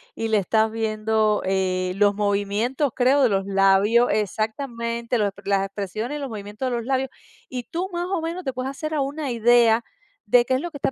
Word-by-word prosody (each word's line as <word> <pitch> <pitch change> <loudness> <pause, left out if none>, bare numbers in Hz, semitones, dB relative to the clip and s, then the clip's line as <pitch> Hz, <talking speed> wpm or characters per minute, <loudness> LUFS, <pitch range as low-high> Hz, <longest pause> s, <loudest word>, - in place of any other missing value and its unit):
y 225 - -2
le 220 -1 +2
estás 220 +3 +2
viendo, 215 -1 0
eh, 185 -1 0
los 205 0 +3
movimientos, 210 +7 0
creo, 265 +2 +3
de 245 - +4
los 195 -1 0
labios 195 +4 +4
Exactamente. 235 +3 -2
Los 205 -2 +1
ep 200 +1 -16
las 195 -1 +2
expresiones 215 +8 -4
y - - -6
los 275 - -4
movimientos 210 +4 -5
de 240 - -1
los 235 -1 -3
labios, 265 0 0 0.4
y 250 -1 -4
tú 360 +7 -4
más 345 0 -2
o 370 -3 -2
menos 340 +3 -4
te 265 - -3
puedes 255 +1 -3
hacer 310 +3 -5
a 290 - +1
una 280 0 -3
idea 235 0 +4 0.4
de 240 +3 +4
qué 260 - 0
es 260 - -1
lo 345 - -4
que 285 - -7
está 270 - -1
230 Hz, 215 wpm, -23 LUFS, 205-265 Hz, 0.4 s, de